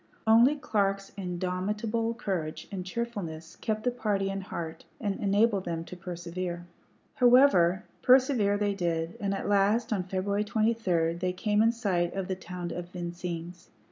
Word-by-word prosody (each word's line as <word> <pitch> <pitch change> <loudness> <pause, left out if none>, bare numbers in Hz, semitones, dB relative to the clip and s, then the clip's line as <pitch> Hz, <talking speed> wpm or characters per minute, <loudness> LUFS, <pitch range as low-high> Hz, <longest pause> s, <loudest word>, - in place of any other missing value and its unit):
Only 230 +6 +6
Clark's 195 -7 -1
indomitable 205 +5 -2
courage 180 -9 -3
and 190 -2 -4
cheerfulness 185 -6 -5
kept 215 -1 -2
the 250 - +2
party 205 -5 -1
in 195 0 -3
heart 165 -3 -6 0.2
and 205 -3 -2
enabled 205 0 +2
them 165 -1 -3
to 180 - -9
persevere. 175 0 -5 0.5
However, 240 -8 +5 0.2
persevere 255 -6 +4
they 205 -1 +1
did, 170 -3 -2
and 200 -1 -1
at 195 - -3
last, 205 +3 +2
on 200 - 0
February 190 +3 -1
23, 210 -7 +1
they 180 +2 -2
came 210 +3 +1
in 225 +1 +5
sight 185 -7 -1
of 195 -2 -2
the 190 - -1
town 180 -1 -6
of 175 0 -5
Vincennes. 175 0 -6
195 Hz, 150 wpm, -29 LUFS, 175-215 Hz, 0.5 s, Only